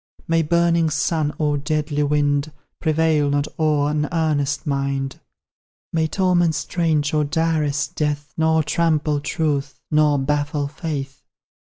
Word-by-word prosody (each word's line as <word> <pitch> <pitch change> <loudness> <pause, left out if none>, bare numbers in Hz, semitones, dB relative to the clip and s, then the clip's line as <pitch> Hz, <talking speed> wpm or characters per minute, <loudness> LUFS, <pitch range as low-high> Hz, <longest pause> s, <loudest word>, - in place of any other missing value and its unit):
May 165 0 +3
burning 170 0 +2
sun 155 0 0
or 150 -2 0
deadly 150 0 -1
wind 145 0 +1 0.3
Prevail 155 -2 +2
not 145 +1 0
o'er 150 -2 +2
an 150 -1 -1
earnest 150 -3 0
mind; 140 -1 -2 0.7
May 160 -1 +1
torments 175 -2 +2
strange 155 -4 0
or 150 -1 +2
direst 155 -2 0
death 145 -2 -2
Nor 160 0 +2
trample 155 -2 +1
truth, 145 -2 -2
nor 150 -1 +4
baffle 145 +1 -1
faith. 145 -3 -5
150 Hz, 125 wpm, -21 LUFS, 145-160 Hz, 0.7 s, nor